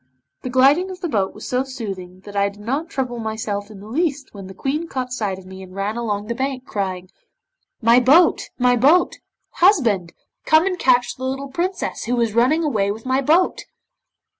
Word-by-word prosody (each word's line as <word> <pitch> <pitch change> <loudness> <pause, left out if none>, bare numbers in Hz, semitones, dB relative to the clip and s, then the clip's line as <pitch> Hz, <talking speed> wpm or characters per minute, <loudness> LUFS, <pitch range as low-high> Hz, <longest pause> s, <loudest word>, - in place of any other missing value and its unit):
The 255 - -5
gliding 275 +9 +4
of 370 -1 -8
the 350 - -1
boat 200 - -1
was - - -8
so 255 0 0
soothing 195 -9 -7
that 205 +1 -11
I 200 0 +2
did 200 +1 -15
not 275 +10 -3
trouble 250 -5 -3
myself 220 -2 -4
in 205 -3 -12
the 205 - -11
least 285 +2 -2
when 195 -2 -9
the 190 - -11
Queen 300 - -2
caught 255 -4 -4
sight 210 -6 -2
of 190 - -13
me 190 0 -10
and 185 0 -12
ran 200 +2 -2
along 210 -3 -2
the 235 - -3
bank, 260 +1 -3
crying 185 -2 -4 0.7
'"My 230 +2 +6
boat, 285 +8 +4
my 250 -1 +3
boat! 295 +9 +3 0.4
Husband, 235 - +3 0.3
come 315 +2 +4
and 365 -2 -1
catch 245 -1 +2
the 260 - -8
little 270 +1 -3
Princess 360 +7 -3
who 245 +1 0
is 230 -3 +1
running 260 +8 +3
away 215 -10 0
with 220 +3 -5
my 260 +1 +1
boat!" 325 +7 +2
245 Hz, 200 wpm, -21 LUFS, 205-275 Hz, 0.7 s, My